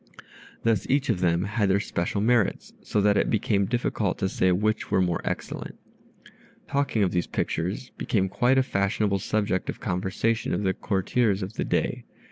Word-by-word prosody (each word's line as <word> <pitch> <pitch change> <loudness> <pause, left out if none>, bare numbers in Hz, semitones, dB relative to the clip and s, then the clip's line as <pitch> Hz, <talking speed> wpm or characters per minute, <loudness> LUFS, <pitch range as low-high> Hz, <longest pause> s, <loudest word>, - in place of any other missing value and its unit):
Thus 110 -3 +1
each 140 +1 +2
of - - +1
them 85 -1 +2
had 105 0 0
their 95 +1 +3
special 100 0 -2
merits, 115 -2 +1
so 105 - 0
that 100 0 +3
it - - +2
became 100 -2 +1
difficult 110 -4 -1
to 95 - 0
say 95 0 +2
which 110 +4 0
were - - +2
more 90 -2 +1
excellent. - - -5 0.9
Talking 135 -6 +1
of 90 - +1
these 90 -1 0
pictures 100 +11 -2
became 95 -4 +1
quite 125 +6 +2
a 130 - +5
fashionable 100 -3 0
subject 100 -1 -1
of - - -4
conversation 95 +5 -1
of - - -2
the 95 -1 +2
courtiers 100 +1 0
of 95 +3 -6
the - - -2
day. - - -1
100 Hz, 175 wpm, -26 LUFS, 95-115 Hz, 0.9 s, a